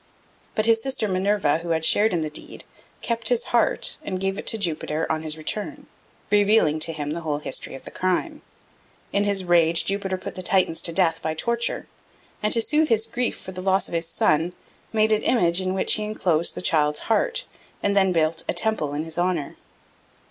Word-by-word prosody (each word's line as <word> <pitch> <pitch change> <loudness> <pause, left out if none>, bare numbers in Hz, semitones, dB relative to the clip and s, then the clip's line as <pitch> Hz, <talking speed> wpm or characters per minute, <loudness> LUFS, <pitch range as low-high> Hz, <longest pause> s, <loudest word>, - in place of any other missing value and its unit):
But 215 - +2
his 225 0 +4
sister 260 -4 0
Minerva, 185 -5 +1
who 170 +1 -7
had 160 -1 0
shared 215 +6 +4
in 170 -3 0
the 155 - -3
deed, - - -6 0.4
kept 230 -1 0
his 245 -1 +2
heart 240 - +2
and 185 -2 -4
gave 195 +1 -2
it - - -8
to 225 - +1
Jupiter 160 -4 -1
on 160 0 -1
his 155 0 -2
return, 250 - -5 0.5
revealing 205 -7 +3
to 160 +1 0
him 150 -2 -4
the 170 +2 -4
whole 150 -3 -2
history 140 -2 -3
of 135 - -11
the - - -8
crime. 185 -1 -1 0.7
In 200 +1 +2
his 200 -2 +1
rage, 170 -1 +3
Jupiter 195 -1 -1
put 185 - -7
the 185 - -6
Titans 185 -3 +2
to 170 - +2
death 165 -1 +1
by 160 0 -2
torture, 235 +7 -1 0.6
and, 210 - 0
to 230 - +4
soothe 305 +3 +2
his 225 -1 +2
grief 245 +1 -1
for 190 - -9
the 185 0 -6
loss 190 0 +1
of - - -11
his 165 0 -1
son, 165 +1 +1 0.4
made 220 0 +2
an 215 - +3
image 175 -7 +2
in 185 0 -2
which 190 - +2
he 215 - 0
enclosed 175 -6 +1
the - - -6
child's 150 -3 +2
heart, - - 0 0.4
and 200 0 +1
then 190 -2 +4
built 160 -1 +1
a - - +2
temple 185 -10 -1
in 150 - -2
his 160 +1 -4
honour. 175 -5 -1
185 Hz, 205 wpm, -24 LUFS, 160-215 Hz, 0.7 s, his